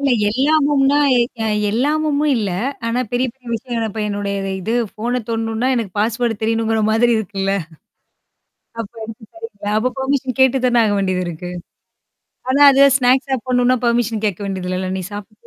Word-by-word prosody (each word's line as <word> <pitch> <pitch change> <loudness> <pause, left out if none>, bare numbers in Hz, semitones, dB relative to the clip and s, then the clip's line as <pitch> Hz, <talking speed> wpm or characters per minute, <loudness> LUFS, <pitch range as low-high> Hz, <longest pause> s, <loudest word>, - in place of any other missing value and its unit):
இல்ல 280 -1 +1 0.2
எல்லாமும்னா, 285 +2 +2 0.2
எ - - +4 0.2
அ - - 0 0.2
எல்லாமும் 295 +5 0
இல்ல. 210 -4 -1 0.4
ஆனா 235 +2 0
பெரிய 250 +1 +1
பெரிய 250 -3 -15
விஷயம். 230 -1 -3
இப்ப 220 +1 -5
என்னுடைய 200 -1 -3 0.2
இது 220 +6 -2 0.2
ஃபோன 245 +3 -2
தோடணும்னா, 225 +2 -1
எனக்கு 210 -6 -3
பாஸ்வர்ட் 225 0 0
தெரியணுங்கிற 225 0 0
மாதிரி 235 +2 +3
இருக்குல்ல. 195 -2 -2 1.3
அப்ப 220 -1 -5 0.9
எடுத்து 255 +1 -2
பர்மிஷன் 265 -1 -1
கேட்டு 265 0 +5
தானே 245 -1 +3
ஆக 205 - +1
வேண்டியது 185 -2 0
இருக்கு. 175 +1 -6 1.0
ஆனா 275 +2 +2
அது 275 +1 +5 0.2
ஸ்நாக்ஸ் 260 +2 +2
சாப்பிடணும்னா 255 0 +1
பெர்மிஷன் 235 -2 0
கேட்க 195 -4 -2
வேண்டியதில்லல. 185 -1 -3
நீ - - -4
சாப்டே. 205 +1 -8
235 Hz, 145 wpm, -19 LUFS, 210-260 Hz, 1.3 s, கேட்டு